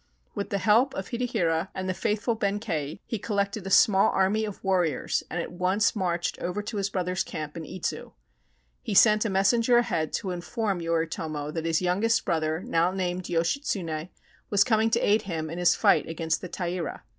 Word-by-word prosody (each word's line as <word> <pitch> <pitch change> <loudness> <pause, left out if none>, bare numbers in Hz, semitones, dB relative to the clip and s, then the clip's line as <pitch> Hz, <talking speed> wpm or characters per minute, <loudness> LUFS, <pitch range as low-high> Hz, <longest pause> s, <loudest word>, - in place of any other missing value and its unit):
With 200 -2 -4
the 200 - 0
help 225 +7 +3
of 190 - -5
Hidehira 190 -9 0
and 185 0 -3
the 185 - 0
faithful 210 +5 -1
Benkei, 195 -8 -2
he 225 - -4
collected 200 -1 -2
a - - -3
small 195 0 +5
army 205 +3 +1
of 210 -2 -8
warriors 180 -8 +1
and 175 - -3
at 170 - -4
once 185 +5 +1
marched 175 -4 -1
over 180 +4 -3
to 210 +1 -5
his 200 0 -1
brother's 185 -1 -1
camp 155 -1 -6
in 165 -2 -6
Idzu. 180 +3 -5 0.7
He 205 - -3
sent 215 +2 +6
a - - 0
messenger 230 +5 +3
ahead 160 -10 0
to 190 - -2
inform 190 +2 -2
Yoritomo 160 -2 -2
that 165 -1 -3
his 165 +2 +1
youngest 210 +6 +1
brother, 160 0 -1
now 165 +2 +2
named 185 -1 -2
Yoshitsune, 170 - -1 0.4
was 200 -1 +4
coming 220 -1 +2
to - - +2
aid 210 +1 +4
him 160 -6 -4
in 170 - -5
his 175 - +4
fight - - +3
against 165 0 -1
the 180 - -7
Taira. 175 -3 -4
185 Hz, 185 wpm, -27 LUFS, 165-210 Hz, 0.7 s, sent